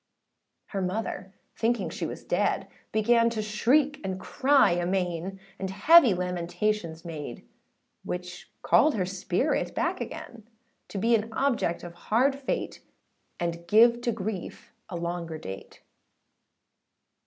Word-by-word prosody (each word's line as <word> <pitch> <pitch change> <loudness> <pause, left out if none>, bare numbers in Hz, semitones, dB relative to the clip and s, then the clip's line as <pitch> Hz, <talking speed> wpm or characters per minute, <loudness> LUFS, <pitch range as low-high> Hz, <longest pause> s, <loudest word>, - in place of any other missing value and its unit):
Her 195 - -3
mother, 190 0 -3 0.2
thinking 235 +1 0
she - - -3
was - - -7
dead, - - 0 0.2
Began 230 +2 +4
to 225 -2 -3
shriek 265 +8 +2
and 190 -1 -3
cry 270 +6 +3
amain; 180 +1 -1 0.2
And 190 - -3
heavy 245 - +6
lamentations 180 0 -2
made, 150 -7 -7 0.6
Which 180 0 -6
called 310 - +4
her 185 -4 0
spirit 190 - -1
back - - -1
again; 230 -1 -8 0.4
To - - -7
be 230 +5 +2
an 225 0 +1
object 235 -9 0
of 175 -1 -8
hard 235 +10 +2
fate, 275 -1 -3 0.6
And 170 0 -3
give 235 +2 +6
to 240 - 0
grief 205 -3 -6 0.2
a 185 - -5
longer 170 -1 -4
date. 95 -8 -9
195 Hz, 125 wpm, -27 LUFS, 175-230 Hz, 0.6 s, heavy